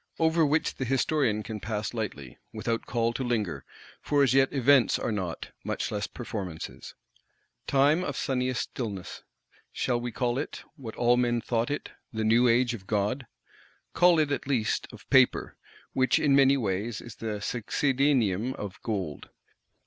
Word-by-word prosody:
Over 160 0 +3
which 150 +1 +1
the - - -2
Historian 130 -4 +1
can 110 -1 -5
pass 105 +2 -3
lightly, 75 - -5
without 115 0 -3
call 115 -1 0
to 130 - -3
linger: 105 - -1 0.4
for 145 -1 +2
as 135 - +3
yet 135 0 +4
events 135 -1 +4
are - - -2
not, 95 -5 -4
much - - -2
less - - -2
performances. 90 -7 -7 0.7
Time 145 +5 +3
of 145 -6 -3
sunniest 130 -1 0
stillness;—shall 115 +2 -5
we 120 0 -3
call 120 +2 -1
it, 145 - -5
what 120 -8 -8
all 120 0 +3
men 120 -1 +2
thought 115 0 -1
it, 145 - -4 0.2
the 110 -2 -2
new 115 +3 +4
Age 120 +1 +3
of 100 -5 -8
Gold? 110 +5 -1 0.7
Call 175 -1 +5
it 150 -2 +2
at 140 - -2
least, 120 -6 0
of - - -14
Paper; - - +4 0.4
which 130 -1 +3
in 140 -2 +3
many 140 0 +5
ways 105 0 -2
is 120 -2 -11
the 110 -2 -4
succedaneum 125 -1 +1
of 100 -2 -7
Gold. 95 - -4
120 Hz, 155 wpm, -28 LUFS, 110-135 Hz, 0.7 s, Call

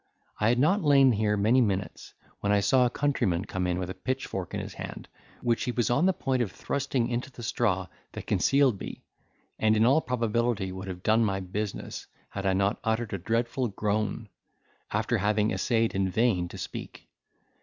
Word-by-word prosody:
I 105 - +3
had 120 - +3
not 170 +11 +3
lain 140 -4 +6
here 105 -1 +1
many 115 +6 +4
minutes, 100 -4 -2 0.2
when 100 - 0
I 105 - +4
saw 125 +5 +4
a - - -2
countryman 120 -10 0
come 95 -3 -2
in 90 0 0
with 90 0 -3
a - - -4
pitchfork 130 -8 -4
in - - -2
his - - -6
hand, - - -7 0.4
which 120 -1 +1
he 125 - 0
was 120 -1 0
upon 145 +9 +3
the - - +5
point 130 -6 -1
of 105 -6 -1
thrusting 135 -2 -1
into 120 +2 -3
the 120 - -10
straw 100 -5 0 0.3
that - - -7
concealed 135 -7 +3
me, - - -8 0.6
and 110 0 +3
in 110 - +4
all 140 +6 +5
probability 115 -5 0
would 95 +1 -7
have 90 -1 -7
done 110 +2 +4
my 95 -3 0
business, 95 +2 -5 0.2
had 100 0 -3
I 95 - +3
not 100 +2 +1
uttered 110 -1 -1
a 100 - -2
dreadful 115 +6 0
groan, 105 +1 -2 0.6
after - - 0
having 105 +1 +1
essayed 115 -2 +1
in 95 -1 0
vain 95 -4 +1
to - - -10
speak. - - -8
110 Hz, 195 wpm, -28 LUFS, 100-125 Hz, 0.6 s, lain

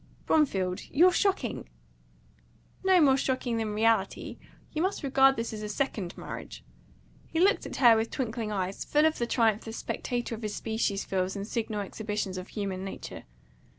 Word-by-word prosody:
"Bromfield, 190 -12 +1
you're 350 +6 +5
shocking!" 360 - 0 1.1
"Not 375 -3 +5
more 270 -2 +5
shocking 255 -3 -1
than 215 -2 -2
reality. 220 -2 +1 0.3
You 310 - -2
may 370 - +3
regard 270 0 +5
this 230 -2 -3
as 215 - -5
a 210 - -4
second 205 -6 -2
marriage." - - -8 0.6
He 325 - -2
looked 390 +3 +3
at - - -7
her 240 -3 +7
with 225 +1 0
twinkling 225 -4 -3
eyes, 190 -1 -2
full 300 +1 +3
of 315 0 +2
the 235 - 0
triumph 225 -3 +2
the 225 - -6
spectator 240 0 -3
of 225 - -6
his 210 -2 -3
species 220 -3 -1
feels 185 0 -1
in 200 0 -4
signal 220 -1 -2
exhibitions 205 -2 -3
of 185 - -8
human 195 -3 -4
nature. 195 - -7
225 Hz, 170 wpm, -29 LUFS, 205-270 Hz, 1.1 s, her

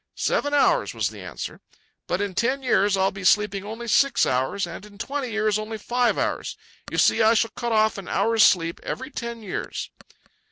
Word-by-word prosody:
"Seven 290 - 0
hours," 290 - +2
was - - 0
the - - -11
answer. - - -7 0.5
"But 180 - -1
in 200 -2 -2
ten 255 +7 0
years 200 -5 +2
I'll 190 0 +2
be 195 0 -9
sleeping 200 0 +2
only 225 +3 -7
six 275 +4 +3
hours, 130 +10 0
and 170 +2 -8
in 210 -1 -14
twenty 265 +4 -3
years 215 -1 0
only 215 +1 -5
five 245 +3 0
hours. - - -2 0.3
You - - -3
see, 230 - +4
I 220 +1 +5
shall 225 0 +1
cut 240 -1 -4
off 220 -2 +2
an 190 - -10
hour's 225 -1 +1
sleep 170 -4 +4
every 260 +3 -5
ten 235 -3 -6
years." 195 - -5
215 Hz, 195 wpm, -24 LUFS, 200-235 Hz, 0.5 s, I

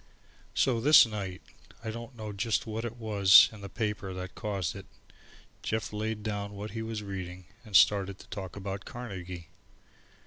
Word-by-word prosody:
So 120 -4 +2
this 150 +2 +8
night, 100 -5 -5 0.4
I 110 - -3
don't 115 +2 -8
know 110 -2 -6
just 105 +3 0
what 110 +1 -4
it 115 0 -5
was 100 -4 +7
in 110 -2 -12
the 100 - -7
paper 105 -4 -3
that 90 0 -6
caused 100 -7 -3
it, - - -9 0.7
Jeff 110 0 -2
laid 105 0 -3
down 105 -1 -3
what 105 +2 -6
he 115 - -4
was 110 -1 -4
reading 95 -2 -6 0.2
and 105 -4 -7
started 100 -1 +5
to - - -15
talk 95 -3 -6
about 100 0 -5
Carnegie. 90 -8 -7
105 Hz, 170 wpm, -30 LUFS, 95-110 Hz, 0.7 s, this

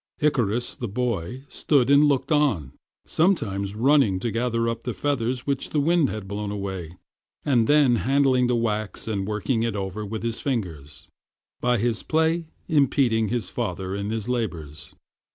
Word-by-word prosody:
Icarus, 120 -5 +1
the 120 - -4
boy, 120 +1 -3
stood 140 -3 +2
and 140 +1 +7
looked 145 +2 +1
on, 130 - +2 0.3
sometimes 105 - 0
running 125 -5 +3
to 115 - -1
gather 115 +1 0
up 115 0 -2
the 125 - -3
feathers 125 -3 -1
which 140 -2 -1
the 150 - 0
wind 160 0 +3
had 105 -3 -5
blown 100 +1 -4
away, 95 -5 -5 0.5
and 120 -6 +3
then 145 -5 +5
handling 130 +3 +3
the 125 - +1
wax 110 -3 -2
and 100 -3 -2
working 110 +3 -1
it 115 -2 -1
over 100 +1 -4
with 110 +2 -5
his 115 0 -2
fingers, 80 - -4 0.5
by 125 0 +2
his 115 0 0
play 160 +1 +1 0.2
impeding 130 -7 +2
his 110 -4 -3
father 95 -5 -3
in 100 +1 -3
his 110 -1 -3
labors. 85 - -4
115 Hz, 160 wpm, -24 LUFS, 100-135 Hz, 0.5 s, and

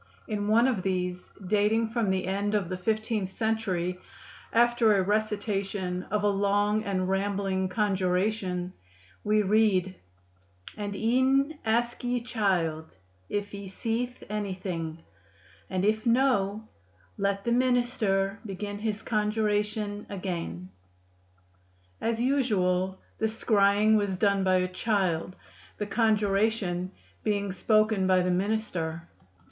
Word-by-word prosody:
In 205 -2 -2
one 230 +4 +5
of 235 -8 0
these, 180 -1 -2 0.2
dating 215 +3 +2
from 225 -3 0
the 190 -1 0
end 200 +2 -1
of 195 -5 0
the 185 - -2
fifteenth 215 +1 -1
century, 190 -5 -1 0.5
after 235 -2 +4
a 190 - +2
recitation 200 -3 -1
of 210 0 0
a - - +4
long 205 +1 +2
and 190 -3 -1
rambling 195 -1 0
conjuration, 185 -1 0 0.5
we 210 0 +3
read: 195 -3 +3 0.8
"And 205 -1 -4
y^{en} 260 +7 +2
ask 235 +2 0
y^e 245 0 0
chylde 175 -9 0 0.4
yf 205 0 -2
h^e 200 -1 -7
seethe 235 +5 -3
any 205 -2 -3
thyng, 165 -3 -5 0.7
and 185 -1 -1
yf 220 +3 +1
no, 220 -4 +2 0.5
let 200 0 0
the 235 - -1
m^r 240 -6 +1
begin 205 0 -5
his 215 0 -3
conjuratyō 210 -1 -1
agayn." 170 - -5 1.3
As 230 0 0
usual 190 -8 +1 0.2
the 220 - +2
scrying 215 -1 +3
was 200 -3 -1
done 200 0 +2
by 185 0 +3
a 185 0 +2
child, 185 -3 -1 0.4
the 210 - -2
conjuration 205 -3 +1 0.3
being 200 -2 0
spoken 215 +1 +2
by 185 -1 +4
the 180 0 +1
minister. 180 -4 -2
205 Hz, 120 wpm, -28 LUFS, 185-220 Hz, 1.3 s, one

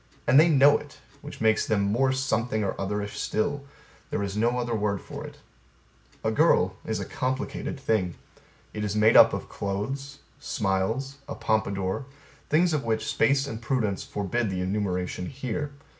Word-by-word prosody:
And 130 +4 +6
they 165 +2 +6
know 145 -1 +6
it 145 - -13 0.2
which - - -9
makes 110 -1 +3
them 105 -2 +2
more 120 +7 +2
something 120 -4 0
or 100 - -1
otherish 105 +1 -3
still: 140 +6 -1 0.4
there 100 - -1
is 100 0 -4
no 120 +3 +1
other 120 -1 -1
word 105 -2 0
for - - -8
it. - - -13 0.9
A - - +1
girl - - +3
is - - -2
a - - -3
complicated 130 +1 -3
thing. 100 -9 0 0.6
It 105 - -4
is 105 -1 -2
made 105 +1 +4
up - - +9
of - - -4
clothes, 135 +8 -4 0.2
smiles, 110 +8 -1
a - - -4
pompadour, 100 +2 -1 0.4
things 170 +2 +3
of 150 - 0
which 110 -1 -1
space 140 0 +2
and 115 -5 -6
prudence 115 -5 -1
forbid 105 +3 -2
the 95 -1 -2
enumeration 90 -2 -2
here. 135 +2 -4
110 Hz, 165 wpm, -26 LUFS, 100-135 Hz, 0.9 s, up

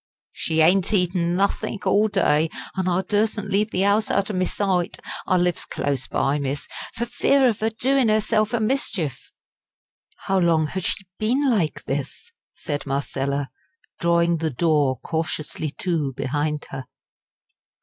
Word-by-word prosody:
"She 160 0 0
ain't 185 +5 +4
eatin' 175 -2 +1
nothink 200 +1 -1
all 210 +2 +4
day, 160 -6 +2 0.3
an' 190 -1 -1
I 180 +1 +1
dursen't 210 +1 0
leave 205 +2 +2
the 190 -1 +1
'ouse 205 +2 +2
out 200 +2 +1
o' - - -5
me 185 -1 +1
sight 185 -4 -1 0.3
I 185 - +3
lives 175 -1 +1
close 140 -3 -2
by, 140 +2 0
miss 140 0 -3 0.3
for 235 - -1
fear 270 +2 +3
of 220 -4 0
'er 220 - +2
doing 255 +2 +2
'erself 215 0 +2
a 235 - +1
mischief." 215 - -2 0.9
"How 195 0 +2
long 165 -3 +3
has 180 +4 -4
she 195 - -1
been 250 +6 +1
like 200 -11 +1
this?" 140 - -4 0.2
said 145 -3 -4
Marcella, 140 0 -2 0.5
drawing 170 0 +3
the 160 0 -1
door 145 -2 +2
cautiously 160 -1 -3
to 160 -7 -1
behind 145 +4 -2
her. 135 -1 -6
180 Hz, 150 wpm, -23 LUFS, 150-210 Hz, 0.9 s, ain't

